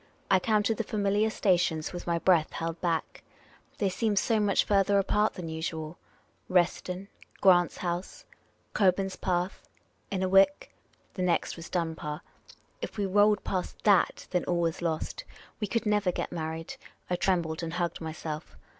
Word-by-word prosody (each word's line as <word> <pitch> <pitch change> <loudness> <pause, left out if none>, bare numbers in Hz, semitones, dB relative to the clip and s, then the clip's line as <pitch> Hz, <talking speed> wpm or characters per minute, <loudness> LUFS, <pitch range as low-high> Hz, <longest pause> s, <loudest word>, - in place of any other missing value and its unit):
I 190 - +6
counted 215 +2 +1
the 230 - 0
familiar 205 +1 +1
stations 175 -7 +1
with 175 - -7
my 170 -1 +1
breath 170 -2 +3
held 165 0 -4
back. 170 -2 -1 0.6
They 200 - +1
seemed 210 +1 0
so 220 +3 +2
much 205 -2 +3
farther 200 0 +3
apart 210 +2 +2
than 175 -2 -6
usual. 160 0 -4 0.5
Reston 180 +1 +1 0.2
— - - -30
Grant's 175 -3 +5
House 175 +1 -4 0.2
— - - -40
Cock 190 -3 +4
burn.spath 185 -1 -2 0.3
— - - -40
Innerwick. 195 +7 +3 0.4
The 185 - -4
next 180 -2 +1
was 165 0 -9
Dunbar. 160 -4 -3 0.6
If - - -6
we 205 - 0
rolled 205 +2 +3
past 185 -2 -3
f/ia^, 200 -4 +3
then 180 -1 0
all 175 -1 0
was 165 0 -1
lost. 160 -2 -2 0.4
We 210 - -1
could 230 +3 -1
never 210 -3 +2
get - - -4
married. 160 -1 -5 0.3
I 180 - 0
trembled 170 -3 0
and 165 -1 -4
hugged 175 -1 -2
myself. 155 - -6
180 Hz, 160 wpm, -29 LUFS, 165-200 Hz, 0.6 s, I